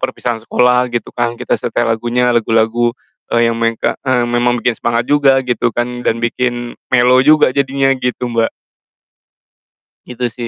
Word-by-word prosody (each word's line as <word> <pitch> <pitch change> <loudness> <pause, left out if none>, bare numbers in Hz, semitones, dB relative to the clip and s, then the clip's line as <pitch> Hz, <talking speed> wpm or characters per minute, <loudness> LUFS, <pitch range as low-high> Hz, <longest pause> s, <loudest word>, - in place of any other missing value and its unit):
perpisahan 120 -2 -3
sekolah, 125 +2 +2
gitu 120 -1 -4
kan, 120 -1 -2
kita - - -4
setel 120 - -1
lagunya, 120 +2 0
lagu-lagu, 115 +1 +1 0.4
eee, 115 0 +3
yang - - -4
mengka 115 0 0
eee, 130 -2 0
memang 120 +1 +1
bikin 120 0 0
semangat 120 0 0
juga 135 -1 +3
gitu 120 -1 0
kan, 120 0 -3
dan 115 - 0
bikin 120 0 -2 0.2
mellow 125 0 +4
juga 150 -1 +4
jadinya, 135 0 +1
gitu, 125 0 -3
Mbak. 115 -1 +1 1.6
Gitu 125 0 -7
sih 120 -2 -5
120 Hz, 155 wpm, -15 LUFS, 120-125 Hz, 1.6 s, mellow